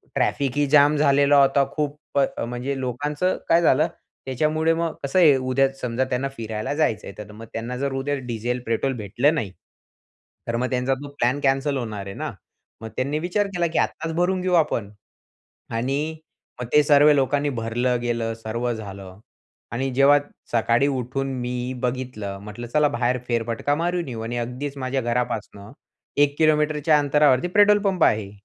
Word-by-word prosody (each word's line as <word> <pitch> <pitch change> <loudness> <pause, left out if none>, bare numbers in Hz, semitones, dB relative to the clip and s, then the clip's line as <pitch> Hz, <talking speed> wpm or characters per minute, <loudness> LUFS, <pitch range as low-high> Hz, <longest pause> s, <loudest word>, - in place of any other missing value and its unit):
Traffic 140 -2 +1
ही 145 - +3
jam 145 +1 +5
झालेला 145 0 +4
होता 135 0 +3
खूप, 150 -1 -2 0.2
अ, 135 - 0
म्हणजे 125 +3 -4
लोकांचं 145 +8 -1
काय 165 +1 +5
झालं, 155 -1 +4 0.4
त्याच्यामुळे 155 +5 +1
मग 165 0 -1
कसं 140 +7 +1
आहे, 155 -6 +7
उद्या 130 +1 +2
समजा 125 +1 -1
त्यांना 130 +2 -1
फिरायला 110 +3 -3
जायचं 115 -9 0
आहे, - - -8
तर 105 -1 -9
मग 110 +2 -10
त्यांना 115 +2 -4
जर 140 +1 -2
उद्या 135 +2 -1
डिझेल, 120 +1 -2
पेट्रोल 115 +4 0
भेटलं 120 +8 +1
नाही, 105 - -3 1.0
तर 115 - -1
मग 125 +1 -1
त्यांचा 125 +1 0
तो 145 - -7
प्लॅन 125 +4 +2
कॅन्सल 135 +1 +1
होणार 110 -5 -5
आहे 100 - -7
ना. - - -4 0.5
मग 110 - -6
त्यांनी 140 +4 -1
विचार 180 +5 0
केला 175 -1 +1
की - - 0
आत्ताच 160 0 -2
भरून 180 +2 +1
घेऊ 185 0 -1
आपण 120 -11 +1 0.9
आणि 140 +7 -1 0.5
मग 125 - -4
ते 150 - +6
सर्व 145 0 +6
लोकांनी 145 +1 +1
भरलं 120 0 -1
गेलं, 115 -1 -1
सर्व 115 +2 -2
झालं 100 -3 -9 0.5
आणि 130 +3 -1
जेव्हा 140 +2 +5 0.3
सकाळी 115 +3 +2
उठून 135 0 -2
मी 125 +1 -3
बघितलं, 125 -6 -3
म्हटलं 105 +3 -8
चला 150 +5 +3
बाहेर 120 +1 0
फेरफटका 120 +4 -1
मारून 175 +1 -1
येऊ 115 -3 -5
आणि 120 +2 -4
अगदीच 125 +4 -4
माझ्या 130 0 -2
घरापासून 115 -4 -3 0.5
1 145 0 +3
किलोमीटरच्या 150 -1 +3
अंतरावरती 145 0 +3
पेट्रोल 205 +2 +5
पंप 190 -4 +1
आहे. 105 -2 +1
135 Hz, 165 wpm, -23 LUFS, 120-145 Hz, 1.0 s, आहे